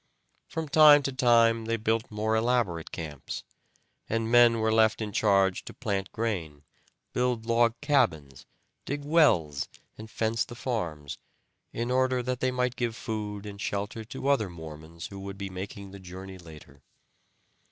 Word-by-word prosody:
From 160 -1 -4
time 145 0 +7
to 135 - -1
time 115 -3 +4
they 115 +1 0
built 110 +1 0
more 110 +1 -1
elaborate 110 -8 0
camps, 75 -4 -6 0.7
and 115 0 -1
men 120 -1 +6
were 110 0 +1
left 110 -1 +4
in 110 -2 -3
charge 95 -2 +2
to - - -9
plant 100 -5 -2
grain, 85 -10 -3 0.5
build 125 -2 0
log 115 0 +2
cabins, 80 - 0 0.4
dig 145 +1 -3
wells, 95 - +3 0.3
and 110 0 -9
fence 110 +1 0
the 120 - -10
farms, 85 - -4 0.5
in 120 +1 -3
order 130 -1 +2
that 125 0 -2
they 130 - +1
might 125 -1 -1
give 115 -1 -2
food 105 -3 -5
and 100 -1 -8
shelter 105 +3 -3
to 135 +3 -6
other 135 -8 +2
Mormons 80 0 -9
who 100 - -9
would 100 0 -7
be 100 -1 -5
making 95 +1 -7
the 100 - -10
journey 95 +1 -9
later. 80 -3 -14
110 Hz, 155 wpm, -28 LUFS, 95-120 Hz, 0.7 s, time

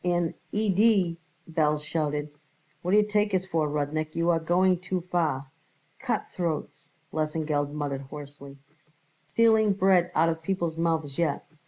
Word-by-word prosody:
"An 175 -2 +1 0.2
idee!" 200 -4 +2 0.3
Belz 150 -2 +1
shouted. 150 -1 -2 0.5
"What 180 - -4
d'ye 210 0 +6
take 210 -1 +1
us 185 0 0
for, 160 -5 0
Rudnik? 150 +1 -2
You 170 +1 +2
are 165 - +2
going 180 +2 +2
too 185 0 -3
far." 155 -7 -1 0.5
"Cutthroats!" 170 -4 -3 0.2
Lesengeld 150 -2 -1
muttered 145 -2 -3
hoarsely. 140 0 -10 0.7
"Stealing 220 -2 +4
bread 190 -3 +3
out 160 +2 +4
of 160 0 -2
people's 170 -2 -2
mouths 160 -4 -1
yet. 160 -4 0
165 Hz, 135 wpm, -27 LUFS, 150-185 Hz, 0.7 s, d'ye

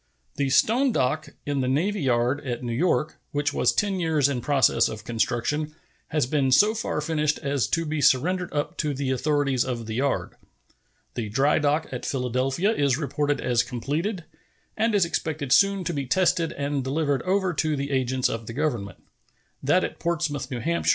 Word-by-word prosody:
The 140 -1 0
stone 245 - +3
dock 155 - 0 0.2
in 145 -2 -1
the 130 - -1
navy 175 +10 0
yard 125 +1 +1
at 125 -2 -4
New 120 -1 -3
York, 155 +2 0
which 145 0 0
was - - +3
ten 200 -2 0
years 160 -5 +2
in 135 -4 -2
process 140 0 +3
of 110 -2 -7
construction, 120 +8 -1 0.3
has 150 -4 0
been 135 0 +1
so 210 +11 +5
far 225 -8 -2
finished 150 -1 0
as 140 -6 -1
to 165 +6 0
be 155 -1 -2
surrendered 175 +7 +2
up 145 0 -3
to 150 -2 -1
the 135 -1 -2
authorities 140 -1 +1
of 120 -3 -4
the 110 - -5
yard. 135 +4 -1 0.8
The 115 -4 -4
dry 135 +8 +2
dock 150 +1 +1
at 125 -1 -5
Philadelphia 130 - 0
is 140 - +1
reported 145 0 -1
as 120 -2 +2
completed, 150 - -3 0.5
and 220 0 +1
is 195 -4 +4
expected 155 -4 -3
soon 195 +8 +4
to 170 - -2
be 140 -3 -3
tested 170 +1 +2
and 140 -1 -2
delivered 145 +1 0
over 190 -1 0
to 155 0 0
the 140 0 -3
agents 130 -1 +1
of 115 -1 -5
the 115 - -6
Government. 120 -9 -3 0.6
That 165 +7 +3
at - - -4
Portsmouth, 155 -5 -2
N. 120 -3 -4
H. 85 -2 0
145 Hz, 185 wpm, -25 LUFS, 130-160 Hz, 0.8 s, so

